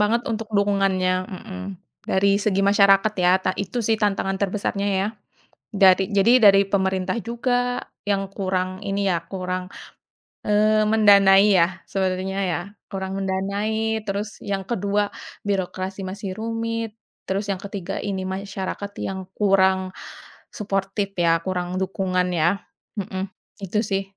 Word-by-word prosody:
Banget 225 Hz, +3 st, +2 dB
untuk 225 Hz, -1 st, -3 dB
dukungannya, 195 Hz, -2 st, +2 dB
mhm. 190 Hz, -2 st, -8 dB, 0.4 s
Dari 195 Hz, +1 st, +3 dB
segi 200 Hz, -1 st, +1 dB
masyarakat, 200 Hz, +1 st, +5 dB
ya, 180 Hz, -1 st, +4 dB
ta 185 Hz, -, 0 dB
itu 200 Hz, +5 st, -3 dB
sih, 225 Hz, 0 st, +1 dB
tantangan 195 Hz, -2 st, 0 dB
terbesarnya, 200 Hz, 0 st, -1 dB
ya. 190 Hz, +1 st, +1 dB, 0.7 s
Dari 190 Hz, -1 st, +4 dB
jadi 225 Hz, +4 st, +4 dB
dari 200 Hz, -1 st, +7 dB
pemerintah 190 Hz, 0 st, 0 dB
juga, 245 Hz, +1 st, 0 dB, 0.2 s
yang 195 Hz, -1 st, 0 dB
kurang 185 Hz, 0 st, -2 dB
ini 200 Hz, -1 st, -1 dB
ya, 170 Hz, -1 st, -1 dB
kurang, 185 Hz, 0 st, -4 dB, 0.8 s
eee, 215 Hz, +1 st, +3 dB
mendanai 205 Hz, -2 st, +6 dB
ya, 175 Hz, +2 st, +1 dB
sebenarnya 190 Hz, 0 st, -1 dB
ya. 175 Hz, -, -1 dB, 0.3 s
Kurang 190 Hz, 0 st, -4 dB
mendanai, 205 Hz, +4 st, -1 dB
terus 200 Hz, +2 st, -4 dB
yang 195 Hz, -1 st, -3 dB
ke-2, 205 Hz, -1 st, -1 dB, 0.3 s
birokrasi 190 Hz, -1 st, -2 dB
masih 195 Hz, 0 st, -5 dB
rumit, 230 Hz, 0 st, -3 dB, 0.3 s
terus 200 Hz, +2 st, -1 dB
yang 190 Hz, -, -5 dB
ke-3, 195 Hz, -3 st, -5 dB
ini 190 Hz, -2 st, -3 dB
masyarakat 195 Hz, +1 st, -4 dB
yang 190 Hz, -1 st, -5 dB
kurang 190 Hz, -2 st, +3 dB, 0.6 s
suportif 195 Hz, -1 st, -2 dB
ya, 165 Hz, -1 st, +3 dB
kurang 185 Hz, 0 st, -2 dB
dukungan 185 Hz, -1 st, 0 dB
ya. 175 Hz, +4 st, +1 dB, 0.4 s
Mhm. 190 Hz, 0 st, -3 dB, 0.4 s
Itu 210 Hz, +3 st, 0 dB
sih, 195 Hz, -1 st, -1 dB
195 Hz, 130 wpm, -23 LUFS, 190-205 Hz, 0.8 s, dari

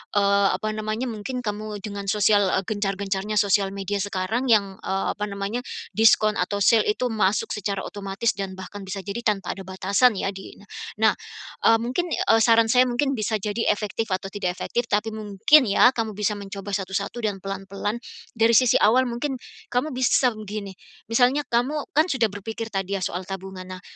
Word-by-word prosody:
eee, 200 Hz, 0 st, +4 dB
apa 215 Hz, -, -3 dB
namanya, 215 Hz, +3 st, -3 dB
mungkin 245 Hz, +4 st, -5 dB
kamu 210 Hz, -1 st, -5 dB
dengan 200 Hz, -2 st, -6 dB
sosial, 205 Hz, -1 st, +3 dB
eee, 190 Hz, -, 0 dB
gencar-gencarnya 200 Hz, 0 st, -2 dB
sosial 200 Hz, -1 st, +2 dB
media 200 Hz, +1 st, -3 dB
sekarang 205 Hz, +5 st, -2 dB
yang, 200 Hz, -5 st, +2 dB
eee, 195 Hz, 0 st, -2 dB
apa 210 Hz, 0 st, -4 dB
namanya, 200 Hz, +3 st, -3 dB, 0.3 s
diskon 215 Hz, -1 st, +4 dB
atau 200 Hz, +3 st, 0 dB
sale 225 Hz, +1 st, +4 dB
itu 245 Hz, +4 st, 0 dB
masuk 210 Hz, -2 st, +1 dB
secara 200 Hz, -1 st, -3 dB
otomatis 200 Hz, +3 st, -2 dB
dan 195 Hz, -2 st, -5 dB
bahkan 190 Hz, +2 st, -9 dB
bisa 195 Hz, 0 st, -5 dB
jadi 200 Hz, +4 st, -4 dB
tanpa 195 Hz, -4 st, 0 dB
ada 195 Hz, -2 st, -8 dB
batasan 195 Hz, +5 st, +2 dB
ya 195 Hz, +1 st, -2 dB
di 195 Hz, 0 st, -10 dB
ini. -, -, -17 dB, 0.4 s
Nah, 220 Hz, -, +7 dB, 0.5 s
eee, 225 Hz, 0 st, +6 dB
mungkin, 255 Hz, +9 st, -1 dB
eee, 225 Hz, 0 st, +3 dB
saran 230 Hz, -1 st, +5 dB
saya 250 Hz, +1 st, +5 dB
mungkin 255 Hz, +3 st, 0 dB
bisa 215 Hz, 0 st, 0 dB
jadi 210 Hz, +3 st, -2 dB
efektif 210 Hz, +2 st, -3 dB
atau 185 Hz, +1 st, -2 dB
tidak 185 Hz, -3 st, -2 dB
efektif 240 Hz, 0 st, -2 dB
tapi 210 Hz, +2 st, 0 dB
mungkin 220 Hz, +7 st, +4 dB
ya, 215 Hz, +3 st, +5 dB
kamu 220 Hz, -2 st, -1 dB
bisa 210 Hz, 0 st, 0 dB
mencoba 200 Hz, 0 st, -7 dB
satu-satu 195 Hz, +4 st, -3 dB
dan 200 Hz, -3 st, -2 dB
pelan-pelan, 195 Hz, +2 st, -4 dB, 0.4 s
dari 225 Hz, +1 st, +4 dB
sisi 250 Hz, 0 st, +5 dB
awal 250 Hz, +5 st, +5 dB
mungkin 240 Hz, +4 st, -3 dB, 0.4 s
kamu 250 Hz, +5 st, +1 dB
bisa 255 Hz, 0 st, +3 dB
begini, 210 Hz, -2 st, -7 dB, 0.3 s
misalnya 250 Hz, +5 st, +3 dB
kamu 265 Hz, +6 st, 0 dB
kan 310 Hz, -, +6 dB
sudah 240 Hz, -7 st, +1 dB
berpikir 225 Hz, +2 st, -6 dB
tadi 195 Hz, 0 st, -2 dB
ya -, -, -7 dB
soal 180 Hz, +1 st, -3 dB
tabungan, 190 Hz, 0 st, -7 dB
nah 185 Hz, 0 st, -8 dB
210 Hz, 180 wpm, -24 LUFS, 195-225 Hz, 0.5 s, Nah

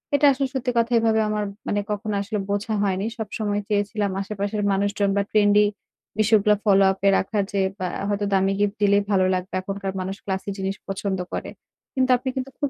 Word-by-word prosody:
এটা 290 Hz, +1 st, +3 dB
আসলে 270 Hz, 0 st, 0 dB
সত্যি 260 Hz, -2 st, -1 dB
কথা 230 Hz, +1 st, +2 dB
এভাবে 225 Hz, -1 st, +2 dB
আমার 210 Hz, 0 st, -1 dB, 0.2 s
মানে 205 Hz, -, +1 dB
কখনো 210 Hz, +1 st, -2 dB
আসলে 210 Hz, +1 st, -3 dB
বোঝা 205 Hz, +2 st, -1 dB
হয়নি। 195 Hz, 0 st, 0 dB
সব 220 Hz, -2 st, -4 dB
সময় 205 Hz, -1 st, -1 dB
চেয়েছিলাম 205 Hz, 0 st, 0 dB
আশেপাশের 205 Hz, +1 st, -3 dB
মানুষজন 200 Hz, +1 st, +1 dB
বা 200 Hz, -, +3 dB
ট্রেন্ডি 210 Hz, 0 st, +5 dB, 0.5 s
বিষয়গুলা 210 Hz, -1 st, +4 dB
ফলোআপে 195 Hz, -1 st, +4 dB
রাখা 210 Hz, +2 st, -1 dB
যে 200 Hz, -1 st, +1 dB, 0.2 s
বা 185 Hz, -, -1 dB, 0.2 s
হয়তো 205 Hz, 0 st, -1 dB
দামি 195 Hz, 0 st, +3 dB
গিফট 205 Hz, 0 st, +1 dB
দিলেই 200 Hz, 0 st, +4 dB
ভালো 190 Hz, -2 st, +3 dB
লাগবে। 185 Hz, 0 st, -3 dB
এখনকার 195 Hz, 0 st, -4 dB
মানুষ 190 Hz, +1 st, -3 dB
ক্লাসি 190 Hz, 0 st, -3 dB
জিনিস 195 Hz, 0 st, -2 dB
পছন্দ 195 Hz, 0 st, -2 dB
করে। -, -, -3 dB, 0.4 s
কিন্তু 260 Hz, -2 st, +1 dB
আপনি 250 Hz, +2 st, -4 dB
কিন্তু 265 Hz, 0 st, -4 dB
খুব 285 Hz, -, 0 dB
205 Hz, 185 wpm, -23 LUFS, 195-215 Hz, 0.5 s, ট্রেন্ডি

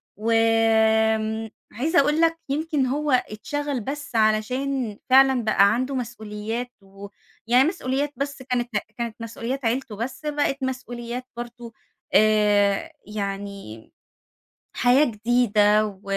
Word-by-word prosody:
وآمم، 220 Hz, 0 st, +2 dB, 0.2 s
عايزة 310 Hz, -, +1 dB
أقول 300 Hz, +3 st, +2 dB
لك 330 Hz, 0 st, +3 dB
يمكن 300 Hz, -1 st, 0 dB
هو 290 Hz, +3 st, -1 dB
اتشغل 265 Hz, +4 st, -1 dB
بس 285 Hz, +1 st, -6 dB
علشان 225 Hz, +2 st, 0 dB
فعلًا 265 Hz, -2 st, +5 dB
بقى 200 Hz, -1 st, +4 dB
عنده 255 Hz, +3 st, -2 dB
مسؤوليات، 225 Hz, 0 st, -5 dB
ويعني 200 Hz, +6 st, -2 dB
مسؤوليات 290 Hz, -4 st, -2 dB
بس 280 Hz, 0 st, -4 dB
كانت 250 Hz, -2 st, -2 dB, 0.3 s
كانت 235 Hz, -2 st, -4 dB
مسؤوليات 230 Hz, +3 st, -5 dB
عيلته 230 Hz, -2 st, -1 dB
بس 245 Hz, +7 st, -6 dB
بقِت 290 Hz, -2 st, 0 dB
مسؤوليات 245 Hz, -1 st, -5 dB
برضو 240 Hz, -1 st, -8 dB, 0.4 s
آآ، 210 Hz, +4 st, +3 dB
يعني 200 Hz, -, -6 dB, 0.9 s
حياة 250 Hz, +5 st, +4 dB
جديدة 215 Hz, -3 st, +2 dB
و 200 Hz, -1 st, -10 dB
235 Hz, 110 wpm, -24 LUFS, 215-270 Hz, 0.9 s, فعلًا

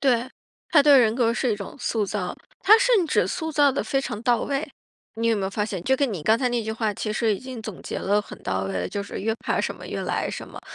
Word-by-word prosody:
对， 255 Hz, -2 st, +2 dB, 0.4 s
他 295 Hz, -, +6 dB
对 285 Hz, -1 st, +7 dB
人 225 Hz, -3 st, +4 dB
格 235 Hz, -2 st, +2 dB
是 245 Hz, -3 st, +1 dB
一 -, -, -2 dB
种 200 Hz, -2 st, -8 dB
塑 220 Hz, -4 st, -1 dB
造， 185 Hz, -3 st, -3 dB, 0.2 s
他 425 Hz, +3 st, +7 dB
甚 475 Hz, -7 st, +3 dB
至 305 Hz, -, +2 dB
塑 320 Hz, -3 st, -3 dB
造 290 Hz, -3 st, +4 dB
得 -, -, -1 dB
非 270 Hz, -, 0 dB
常 210 Hz, -5 st, -5 dB
到 240 Hz, -2 st, +2 dB
位。 280 Hz, +2 st, -2 dB, 0.5 s
你 230 Hz, +1 st, -1 dB
有 230 Hz, -1 st, +3 dB
没 200 Hz, -, -2 dB
有 190 Hz, -, -2 dB
发 210 Hz, +1 st, -1 dB
现， 195 Hz, -5 st, -4 dB
就 265 Hz, +5 st, +2 dB
跟 275 Hz, -3 st, +1 dB
你 165 Hz, -6 st, -5 dB
刚 220 Hz, +7 st, +3 dB
才 250 Hz, 0 st, +1 dB
那 240 Hz, -1 st, -1 dB
句 220 Hz, -, -4 dB
话 220 Hz, -1 st, -1 dB
其 215 Hz, +1 st, -3 dB
实 220 Hz, -1 st, +1 dB
已 -, -, -7 dB
经 255 Hz, -3 st, -7 dB
总 215 Hz, -5 st, -8 dB
结 -, -, -4 dB
了 205 Hz, +1 st, +1 dB
很 -, -, -11 dB
到 95 Hz, 0 st, -1 dB
位 95 Hz, -, -3 dB
的， 90 Hz, -1 st, -2 dB
就 200 Hz, -, -3 dB
是 200 Hz, -, -7 dB
越 220 Hz, +3 st, -1 dB
怕 -, -, +1 dB
什 -, -, -2 dB
么 -, -, -12 dB
越 -, -, -4 dB
来 -, -, -1 dB
什 -, -, -6 dB
么。 -, -, -10 dB
230 Hz, 305 characters per minute, -24 LUFS, 205-270 Hz, 0.5 s, 对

